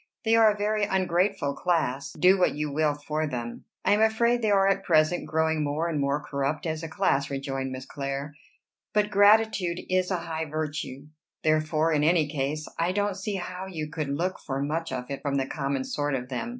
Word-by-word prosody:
"They 225 Hz, +1 st, +4 dB
are 225 Hz, -1 st, +7 dB
a 210 Hz, -, -5 dB
very 210 Hz, +1 st, 0 dB
ungrateful 185 Hz, -4 st, +1 dB
class, 140 Hz, -6 st, -1 dB
do 185 Hz, +4 st, +4 dB
what 180 Hz, -, +3 dB
you 150 Hz, 0 st, -2 dB
will 150 Hz, 0 st, +2 dB
for 155 Hz, +1 st, -2 dB
them." 120 Hz, -4 st, -5 dB, 0.2 s
"I -, -, +3 dB
am 210 Hz, +1 st, +4 dB
afraid 235 Hz, +2 st, +3 dB
they 220 Hz, -, +1 dB
are 195 Hz, -1 st, +4 dB
at 195 Hz, 0 st, +1 dB
present 155 Hz, 0 st, +2 dB
growing 160 Hz, 0 st, +1 dB
more 150 Hz, +3 st, -1 dB
and 160 Hz, -3 st, -1 dB
more 140 Hz, +1 st, +1 dB
corrupt 140 Hz, +3 st, -2 dB
as 160 Hz, -1 st, -2 dB
a 165 Hz, -, -5 dB
class," 140 Hz, -2 st, +1 dB
rejoined 135 Hz, -1 st, -3 dB
Miss 130 Hz, 0 st, -6 dB
Clare; 140 Hz, +1 st, -4 dB, 0.6 s
"but 210 Hz, 0 st, +2 dB
gratitude 205 Hz, -3 st, +4 dB
is 185 Hz, 0 st, +2 dB
a 185 Hz, -, 0 dB
high 165 Hz, -1 st, -4 dB
virtue, 150 Hz, -3 st, -4 dB, 0.4 s
therefore 155 Hz, +1 st, +2 dB
in 150 Hz, -1 st, +2 dB
any 160 Hz, -1 st, +3 dB
case 150 Hz, +1 st, -3 dB
I 170 Hz, +2 st, +1 dB
don't 205 Hz, 0 st, 0 dB
see 200 Hz, +1 st, -3 dB
how 185 Hz, 0 st, -5 dB
you 155 Hz, -5 st, -5 dB
could 155 Hz, -3 st, -3 dB
look 175 Hz, +7 st, -1 dB
for 135 Hz, -2 st, -4 dB
much 155 Hz, +3 st, -2 dB
of 125 Hz, +1 st, -5 dB
it 140 Hz, -, -4 dB
from 140 Hz, -2 st, -1 dB
the 135 Hz, -1 st, +1 dB
common 135 Hz, -1 st, -2 dB
sort 145 Hz, +1 st, -1 dB
of 125 Hz, -1 st, -5 dB
them. 135 Hz, -, -3 dB
155 Hz, 205 wpm, -27 LUFS, 140-185 Hz, 0.6 s, are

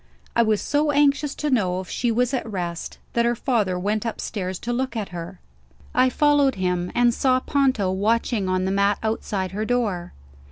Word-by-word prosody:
I -, -, +5 dB
was 215 Hz, -2 st, +2 dB
so 295 Hz, +1 st, +1 dB
anxious 285 Hz, 0 st, +2 dB
to 300 Hz, -1 st, -2 dB
know 185 Hz, -7 st, +1 dB
if 185 Hz, -, -7 dB
she 240 Hz, +5 st, -1 dB
was 245 Hz, +3 st, +1 dB
at 230 Hz, -4 st, -2 dB
rest, 175 Hz, -3 st, -4 dB, 0.2 s
that 235 Hz, -, +2 dB
her 240 Hz, 0 st, +2 dB
father 215 Hz, -7 st, 0 dB
went 205 Hz, +3 st, -1 dB
upstairs 195 Hz, -5 st, -4 dB
to 240 Hz, +5 st, -3 dB
look 255 Hz, 0 st, -2 dB
at 210 Hz, -3 st, -3 dB
her. 175 Hz, +1 st, -7 dB, 0.5 s
I 255 Hz, +1 st, +4 dB
followed 290 Hz, 0 st, +3 dB
him 180 Hz, -1 st, -1 dB
and 240 Hz, -1 st, +4 dB
saw 255 Hz, +1 st, +2 dB
Ponto 260 Hz, -9 st, +1 dB
watching 210 Hz, +1 st, 0 dB
on 185 Hz, 0 st, +1 dB
the 190 Hz, -, 0 dB
mat 200 Hz, +1 st, +2 dB
outside 205 Hz, -4 st, -2 dB
her 210 Hz, +3 st, -3 dB
door. 215 Hz, -7 st, -1 dB
220 Hz, 190 wpm, -23 LUFS, 190-255 Hz, 0.5 s, I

